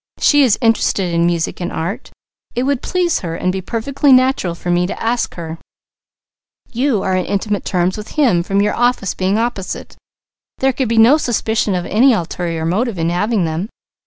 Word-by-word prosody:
She 290 -1 +4
is 245 -7 +4
interested 200 -5 +1
in 170 0 +2
music 170 +1 -2
and 175 - -3
art; 195 +10 -4 0.5
it 245 - 0
would 275 -1 0
please 355 -2 0
her 165 -2 -5
and 185 - -1
be 190 0 -3
perfectly 260 +8 0
natural 255 -9 +3
for 175 +1 -4
me 175 0 +2
to - - -6
ask 230 +1 -1
her; 165 -1 -7 1.1
you 245 -3 0
are 190 - 0
on 185 -1 0
intimate 205 0 -2
terms 180 0 0
with 210 - -8
him 240 - +3
from 195 +3 0
your 210 - +1
offices 240 -5 0
being 190 +2 0
opposite; 225 -5 -4 0.6
there 265 0 +1
could 255 -2 -2
be 230 - 0
no 235 +7 +6
suspicion 220 -7 0
of 175 -1 -2
any 250 +5 +4
ulterior 170 -4 -3
motive 205 +5 -1
in 165 0 0
having 205 +2 0
them. 165 +6 -3
205 Hz, 190 wpm, -17 LUFS, 175-245 Hz, 1.1 s, no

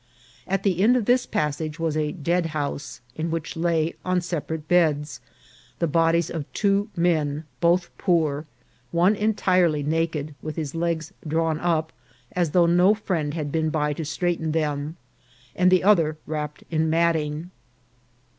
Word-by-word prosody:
At 195 +1 -1
the 185 -3 +1
end 240 +5 +5
of 235 - -1
this 245 +2 +3
passage 150 +1 -2
was 165 -2 -1
a 150 -1 0
deadhouse, 155 -5 -2
in 160 +1 -2
which 165 -1 -3
lay, 165 -1 +1
on 185 0 +1
separate 160 -3 -4
beds, 155 -4 +2 0.6
the 170 - +1
bodies 165 +1 +2
of 155 -4 -5
two 200 +1 +1
men, 155 -4 +1 0.2
both 175 +1 +2
poor, 160 -5 +1 0.4
one 175 +7 +3
entirely 185 -7 +2
naked, 155 -1 -1
with 155 -1 -5
his 150 -4 -4
legs 165 +1 -2
drawn 160 0 0
up, 160 -2 0 0.4
as 175 -3 0
though 175 +3 +4
no 180 +4 +5
friend 165 -8 -2
had 150 -3 -3
been 160 0 0
by 150 -1 0
to 160 - -5
straighten 160 0 -1
them, 150 0 -2 0.6
and 180 0 +4
the 185 -1 +4
other 165 -7 +4
wrapped 150 -1 -4
in 160 0 +1
matting. 160 0 0
165 Hz, 150 wpm, -24 LUFS, 155-175 Hz, 0.6 s, end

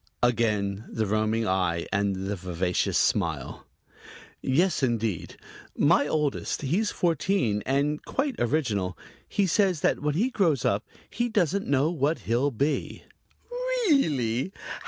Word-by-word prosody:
Again 110 -4 +1
the 110 - -1
roaming 110 +2 0
eye 90 -3 0
and 100 -1 +1
the 100 +1 -2
vivacious 90 -1 -1
smile. - - -1 0.7
"Yes, 160 +6 +2
indeed. 115 -7 -1 0.4
My - - +4
oldest 150 -1 -1
he's 185 +11 +1
fourteen 165 - 0
and 145 +3 0
quite 275 0 -1
original. 110 - 0 0.3
He 200 - +1
says 185 -3 +2
that - - +2
when 150 0 -1
he 235 +10 +1
grows 165 - +1
up 100 +1 +1 0.2
he 240 +2 -2
doesn't 200 -3 +1
know 140 +3 +2
what 155 -1 0
he'll 120 +7 +2
be." 140 +4 -2 0.5
"Really? 275 - +1
135 Hz, 125 wpm, -26 LUFS, 110-175 Hz, 0.7 s, My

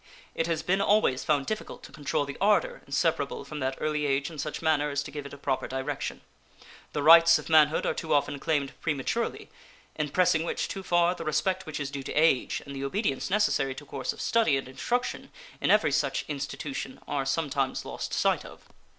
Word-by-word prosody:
It 165 - -1
has 165 -2 -1
been 190 +2 +1
always 200 -12 +3
found 145 -3 +1
difficult 215 +6 -5
to - - -11
control 145 0 -1
the 140 - -6
ardor 205 +1 +2
inseparable 140 0 0
from 150 - -6
that 130 0 -2
early 150 -1 0
age 140 +2 0
in 155 - -9
such 150 +2 -3
manner 150 -2 +2
as 145 0 -1
to 140 - -9
give 145 -1 -6
it - - -12
a - - -13
proper 135 -1 -2
direction. 135 +2 -4 0.7
The 145 - -1
rights 165 +1 +8
of - - -8
manhood 155 -1 +5
are - - +1
too 160 - -5
often 145 -1 +1
claimed 145 -3 -1
prematurely, 155 - -2 0.4
in 150 -1 -2
pressing 170 0 +3
which 170 - -2
too 195 - -5
far 175 -1 +2
the 170 - -7
respect 180 +4 0
which 155 - -4
is 140 -1 -3
due 140 -1 -4
to - - -6
age 155 -4 +2
and 140 -1 -8
the 135 - -4
obedience 140 - -1
necessary 195 -10 +1
to 140 - -9
a - - -18
course 130 - -3
of - - -9
study 220 -12 +3
and 135 - -5
instruction 245 - -2 0.3
in - - +1
every 170 -8 +4
such 140 -1 0
institution 140 -2 -5
are 140 -2 -1
sometimes 135 -2 -1
lost - - -5
sight - - +1
of. - - -12
150 Hz, 210 wpm, -28 LUFS, 140-165 Hz, 0.7 s, rights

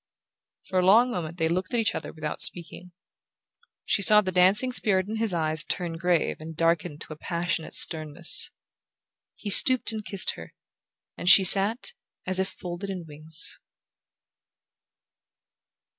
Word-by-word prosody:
For 185 - -3
a - - 0
long 225 +7 +3
moment 170 -5 -7
they 165 -2 -1
looked 185 +8 -4
at - - 0
each 220 - -1
other - - -7
without 155 -2 -7
speaking. 175 +1 +2 0.9
She - - -1
saw 210 +2 +6
the 190 -2 -5
dancing 190 +8 +2
spirit 190 -6 +3
in 220 +1 -6
his 225 -2 -2
eyes 155 -2 -2
turn 170 -2 -5
grave 175 -2 -1
and 160 0 -11
darken 165 -2 -2
to 155 - -10
a - - -13
passionate 170 0 -5
sternness. 155 +1 0 0.9
He 205 - -5
stooped 255 +3 +5
and 220 -1 -7
kissed 195 -2 0
her, 80 -1 -14 0.6
and 175 - -1
she 195 - +7
sat 205 - +4 0.3
as 185 0 +2
if 190 - -1
folded 180 +2 -9
in 185 -3 -7
wings. 155 +1 0
180 Hz, 150 wpm, -24 LUFS, 160-200 Hz, 0.9 s, she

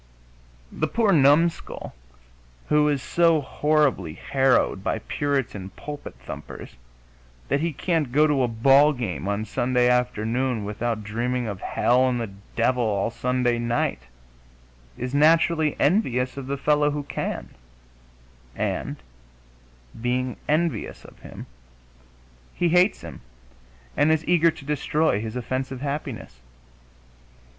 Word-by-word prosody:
The 155 - -1
poor 220 +3 +2
numskull 155 +1 +2 0.8
who 150 0 +4
is 140 -3 -1
so 165 +4 +3
horribly 145 - 0
harrowed 130 - +1
by - - -1
Puritan 125 -6 -2
pulpit 145 0 -8
thumpers - - -9 0.7
that 140 - +2
he 165 +2 -1
can't 155 -3 -1
go 150 +4 +4
to 145 -3 +2
a 125 - +2
ball 135 +6 +5
game 95 - -4
on 100 +1 -1
Sunday 125 +2 +1
afternoon 125 -1 0
without 110 +1 -3
dreaming 120 +4 -2
of 100 -4 -5
hell 125 +2 +2
and 125 -1 -1
the 115 -4 -4 0.2
devil 125 +1 +2
all 105 0 0
Sunday 125 -1 0
night 120 - -1 1.0
is 125 +2 -4
naturally 160 +1 +3
envious 130 - +1
of 135 -2 -7
the 140 +1 -2
fellow 150 +1 +2
who 145 0 -3
can, 140 - -4 1.1
and - - -3 1.0
being 125 +1 -1
envious 155 -7 -1
of - - -15
him, - - -10 1.1
he 175 - +1
hates 180 +4 +3
him - - -10 0.7
and 155 - +3
is 160 0 +1
eager 170 -1 +4
to 150 -3 -8
destroy 150 -4 0
his 110 +1 -6
offensive 130 +1 -3
happiness. 140 - -5
130 Hz, 125 wpm, -24 LUFS, 120-150 Hz, 1.1 s, ball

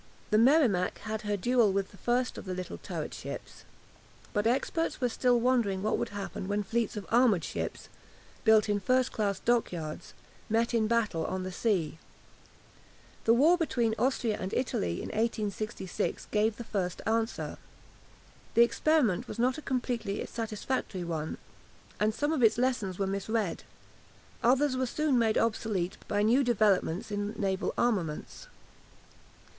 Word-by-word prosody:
The 215 - +5
"Merrimac" 235 - +4
had 220 -1 -4
had 210 - -6
her 205 - +1
duel 235 +1 +3
with 195 0 -1
the 200 - -15
first 245 +3 0
of - - -10
the 185 -1 -3
little 185 0 -6
turret - - -5
ships. - - -8 0.7
But 205 0 +1
experts 275 +7 0
were 250 - +1
still 245 +1 +2
wondering 230 -6 +1
what 215 - +1
would - - -2
happen 200 -2 -5
when 205 +1 0
fleets 230 +2 -1
of 205 - -5
armoured 230 -7 +4
ships, - - -4 0.6
built 220 -2 +5
in 205 -1 +1
first 255 +5 +2
class 200 -3 -1
dockyards, 175 -10 -1 0.3
met 230 +2 +1
in 220 -2 +2
battle 215 -8 +1
on 185 0 -3
the 185 - -4
sea. 180 -6 0 1.3
The 230 - +5
war 325 +8 +5
between 240 -8 +1
Austria 245 -4 +1
and 190 - -4
Italy 90 - -1
in - - -5
1866 215 -3 -2
gave 215 +1 +2
the 235 - -6
first 190 -6 -3
answer. 225 +1 -1 1.0
The 235 - +8
experiment 245 - +2
was - - -7
not 250 +4 +1
a - - -9
completely 245 -7 -2
satisfactory 220 -3 -3
one, 160 -2 -3 0.6
and 215 +1 +3
some 295 +4 0
of 300 - 0
its 225 -1 +5
lessons 240 -7 0
were 195 - 0
misread. 200 0 -2 0.8
Others 260 +3 +3
were 255 0 0
soon 285 0 +1
made 225 -2 +2
obsolete 210 -5 0
by 205 0 +1
new 245 +6 +4
developments 210 -5 +1
in 205 +1 -2
naval 195 -2 -1
armaments. 185 -11 -1
220 Hz, 155 wpm, -30 LUFS, 195-245 Hz, 1.3 s, The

